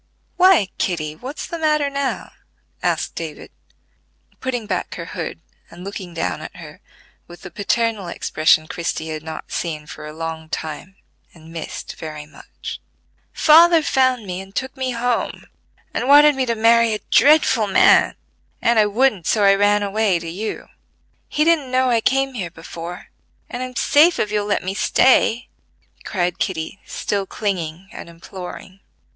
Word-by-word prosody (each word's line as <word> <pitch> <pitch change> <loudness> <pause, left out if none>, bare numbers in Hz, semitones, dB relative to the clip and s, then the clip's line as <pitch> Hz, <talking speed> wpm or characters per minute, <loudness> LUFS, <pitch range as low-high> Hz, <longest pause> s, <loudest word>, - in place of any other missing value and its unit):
"Why, 360 - +5
Kitty, 155 -4 -2
what's 260 - -7
the 335 - -6
matter 305 -2 +2
now?" 280 -1 -3 0.5
asked - - -1
David, - - -7 0.9
putting 245 -4 -3
back 190 -3 -3
her 170 - -6
hood, 165 -1 -6 0.3
and 175 +1 -12
looking 190 -3 -7
down - - -2
at - - -9
her - - -12 0.5
with 175 0 -13
the 180 - -9
paternal 215 -1 -1
expression 155 -2 +2
Christie 160 -1 -4
had 155 -1 -4
not 160 0 -8
seen 155 -3 -3
for 150 - -9
a - - -7
long 160 0 -6
time, 160 +5 -6 0.4
and 165 0 -15
missed 165 - -7
very 150 -1 -7
much. 155 - -10 0.5
"Father 330 +1 +6
found 255 -5 +2
me, 185 0 -5
and 195 +1 -14
took 260 +1 -3
me 260 -1 -2
home, 240 0 -2 0.5
and 250 - -2
wanted 295 +1 +7
me 265 -2 -1
to 230 - 0
marry 230 0 +4
a 210 - -7
dreadful 285 -7 +5
man, 195 - +5 0.4
and 235 -2 +3
I 210 - +5
wouldn't, 210 -4 +1
so 215 - +2
I 195 0 +6
ran 205 +1 +3
away 200 -2 +1
to 170 0 -7
you. 200 +6 -5 0.6
He 300 - +1
didn't 315 -5 +2
know 255 0 +2
I 230 -1 +2
came 270 +2 +1
here 190 -8 -4
before, 165 +1 -9 0.4
and 245 - -4
I'm 255 0 -6
safe 310 +8 +4
if 210 - -1
you'll 210 -1 -1
let 205 - 0
me 185 +1 -3
stay," 235 +2 +3 0.6
cried 180 -3 -2
Kitty, 175 +1 -3
still 200 -1 -2
clinging 185 -4 -3
and - - -9
imploring. 180 +2 -10
205 Hz, 160 wpm, -20 LUFS, 170-255 Hz, 0.9 s, wanted